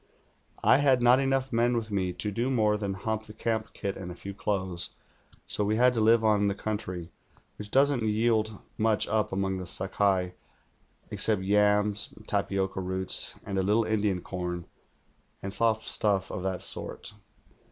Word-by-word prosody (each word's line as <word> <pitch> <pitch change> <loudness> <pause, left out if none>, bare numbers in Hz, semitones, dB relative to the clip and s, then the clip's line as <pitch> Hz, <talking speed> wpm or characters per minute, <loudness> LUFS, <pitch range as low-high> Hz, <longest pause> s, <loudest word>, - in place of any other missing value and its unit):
I - - +6
had 135 -4 +3
not 125 +2 +6
enough 135 -1 0
men 120 +1 +2
with 110 -2 -4
me 95 -3 0
to 105 +3 -4
do 120 +5 -1
more 110 -5 +2
than 100 -2 -3
hump 110 +3 -3
the 105 - -10
camp 110 0 -2
kit 100 -1 -4
and 90 -2 -7
a - - -8
few 100 +2 -8
clothes, 95 -3 -2 0.6
so 105 - -1
we 105 +1 +1
had 125 +2 +4
to 115 - 0
live 115 +1 +4
on 105 -2 +3
the 100 - -1
country, 95 -5 -5 0.5
which 105 0 -8
doesn't 135 +1 +3
yield 110 -1 0 0.2
much 110 -1 +2
up 110 -1 0
among 95 0 -1
the 90 - -6
Sakai 95 -2 +1 0.8
except 105 -4 +3
yams 105 0 +2
and 110 - -16
tapioca 95 -1 -1
roots 95 0 0
and 100 -1 -2
a - - +3
little 105 +4 +2
Indian 105 -4 0
corn, 90 -2 -5 0.8
and 95 0 -4
soft 110 +1 +2
stuff 100 -3 +1
of 90 - -4
that 95 -1 -3
sort. - - -2
105 Hz, 175 wpm, -28 LUFS, 95-110 Hz, 0.8 s, I